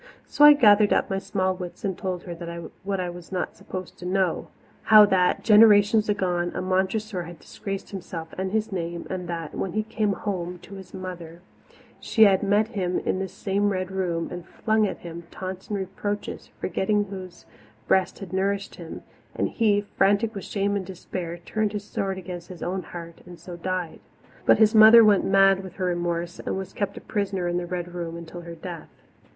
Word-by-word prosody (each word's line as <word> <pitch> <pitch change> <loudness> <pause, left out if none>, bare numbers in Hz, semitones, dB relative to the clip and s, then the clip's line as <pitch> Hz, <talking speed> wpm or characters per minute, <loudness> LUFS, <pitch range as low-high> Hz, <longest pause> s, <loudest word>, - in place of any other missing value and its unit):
So 295 - +1
I 295 0 +11
gathered 210 -6 +5
up - - +2
my 195 - 0
small 190 -1 -1
wits 180 +2 -7
and 190 -2 -1
told 185 -1 -4
her 175 - -6 0.5
what 195 0 -2
I 180 - -1
was 175 +1 -11
not 185 -1 -3
supposed 185 -1 -8
to 180 - -8
know 185 -2 0 0.4
how 215 -1 +9
that, 185 -3 +2
generations 210 0 +6
agone, 180 -4 0
a - - -2
Montressor 190 +2 -1
had 175 -1 -10
disgraced 195 -1 -6
himself 170 -4 -7
and 190 0 -3
his 220 0 -1
name, 170 -2 -4
and 180 -2 -4
that, 165 -3 -4
when 185 - -3
he 215 - 0
came 215 -2 -1
home 180 -2 -4
to - - -12
his 190 -1 -10
mother, 175 -2 -8 0.6
she 220 - +3
had 195 -3 +5
met 205 +2 +2
him 185 -6 -1
in 185 - -1
that 190 0 -3
same 200 +2 0
Red 185 -1 -2
Room 175 -3 -1
and 175 - -6
flung 220 -1 +1
at - - -5
him 170 0 -9
taunts 185 0 -7
and 205 - -1
reproaches, 200 +2 -4
forgetting 205 +1 0
whose 190 -3 -9 0.4
breast 190 -2 +2
had 190 -3 -9
nourished 195 +1 -1
him; 165 -2 -9 0.3
and - - 0
that - - -15
he, 210 -3 +3
frantic 205 +2 +1
with 195 - -6
shame 200 0 -1
and 190 -3 -3
despair, 180 -2 -6
turned 210 +4 -2
his 205 -1 -4
sword 195 -2 -3
against 175 -2 -7
his 180 -2 -8
own 185 +2 -2
heart 170 -2 -10
and 175 -1 -11
so 180 - -9
died. 180 -1 -3 0.5
But - - +7
his 215 0 +5
mother 220 +1 +9
went 205 -2 +4
mad 195 0 +4
with 190 -2 -9
her 185 - -2
remorse, 175 -1 -2
and - - -3
was 190 0 -6
kept 200 -1 -3
a - - -7
prisoner 195 -4 -2
in 175 0 0
the 175 0 -3
Red 175 0 -4
Room 170 -1 -5
until 170 +1 -9
her 170 0 -9
death. 170 0 -8
190 Hz, 200 wpm, -25 LUFS, 175-205 Hz, 0.6 s, I